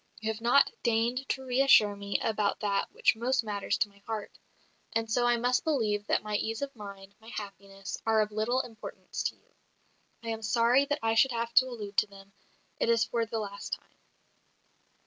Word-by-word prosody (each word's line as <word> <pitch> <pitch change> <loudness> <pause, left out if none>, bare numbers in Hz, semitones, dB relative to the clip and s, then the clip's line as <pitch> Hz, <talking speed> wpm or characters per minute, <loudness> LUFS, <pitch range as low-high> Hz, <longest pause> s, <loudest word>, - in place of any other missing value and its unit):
You 220 0 -1
have 220 +1 -8
not 245 +4 +5
deigned 235 +3 0
to 265 -1 -2
reassure 250 -5 +5
me 200 0 -2
about 210 -2 0
that 200 -2 0
which - - +3
most 245 +2 +1
matters 205 -2 -1
to 215 - +1
my 200 0 -22
heart. 220 -2 -4 0.6
And 225 -1 -1
so 240 +2 +2
I 240 0 +3
must 245 +2 +1
believe 215 -10 0
that - - +1
my 210 -1 -1
ease 225 +5 -2
of 275 -1 -5
mind, 200 -2 -10
my 220 - -17
happiness, 200 -3 -7
are 220 -1 +3
of 210 0 -1
little 220 +5 +1
importance 225 -4 -8
to - - -1
you. - - -34 0.7
I 230 - -4
am 225 0 -3
sorry 235 +5 +3
that 290 +1 -1
I 225 0 +2
should 245 +3 +4
have 230 0 -2
to 260 - +6
allude 210 -5 -7
to 215 - +4
them; 195 0 -16 0.5
it - - +1
is 230 0 +4
for 230 -1 -1
the 225 - -3
last 200 -2 -5
time." - - -8
225 Hz, 200 wpm, -29 LUFS, 205-240 Hz, 0.7 s, to